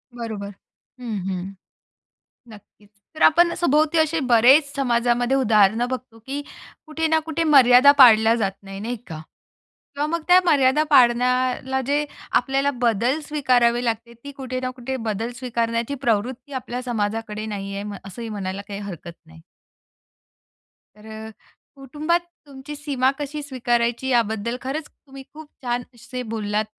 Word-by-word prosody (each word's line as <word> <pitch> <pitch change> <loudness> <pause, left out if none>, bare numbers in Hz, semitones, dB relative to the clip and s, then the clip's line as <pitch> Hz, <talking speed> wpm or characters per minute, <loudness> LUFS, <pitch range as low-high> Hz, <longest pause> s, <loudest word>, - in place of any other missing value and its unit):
बरोबर. 215 -4 -6 0.5
हं, 230 -4 -4
हं. 190 +1 -5 1.0
नक्कीच. 205 0 -18 0.3
तर 310 - -4
आपण 340 +2 +5
सभोवती 310 0 +2
असे 315 0 +1
बरेच 270 +5 +5
समाजामध्ये 245 -1 +1
उदाहरण 220 -3 +3
बघतो, 250 -3 -6
की 280 +2 -4 0.4
कुठे 320 +1 -2
ना 320 0 +3
कुठे 325 +1 -1
मर्यादा 270 -2 +7
पाळल्या 225 -3 +7
जात 200 -5 -1
नाही. 195 0 -9
नाही 240 +3 -4
का? 155 -1 -8 0.7
किंवा 290 +1 -1
मग 335 +1 -2
त्या 360 +1 +7
मर्यादा 290 -2 +3
पाळण्याला 255 0 +3
जे 290 +1 +1 0.3
आपल्याला 275 +1 +1
बदल 240 +5 +1
स्वीकारावे 245 -5 +2
लागते. 230 +1 -3
ती 285 - -8
कुठे 255 -2 -5
ना 255 0 -3
कुठे 260 +1 -4
बदल 225 +3 -2
स्वीकारण्याची 235 0 -2
प्रवृत्ती 250 +2 -2
आपल्या 250 -1 -5
समाजाकडे 215 -2 -3
नाही 200 -2 -5
आहे. 205 0 -6
असंही 225 +4 -8
म्हणायला 200 -2 -5
काही 200 0 -6
हरकत 175 -4 -8
नाही. 160 0 -16 1.6
तर 220 +1 -10 0.5
कुटुंबात 300 +6 -1 0.3
तुमची 275 +2 -9
सीमा 275 -3 0
कशी 295 +1 -5
स्वीकारायची? 240 -2 -1
याबद्दल 235 0 0
खरंच 285 +4 -4
तुम्ही 270 -1 -14
खूप 310 -1 -12
छान 245 0 -2
असे 250 +2 -7
बोललात, 210 0 -1
245 Hz, 135 wpm, -22 LUFS, 220-280 Hz, 1.6 s, मर्यादा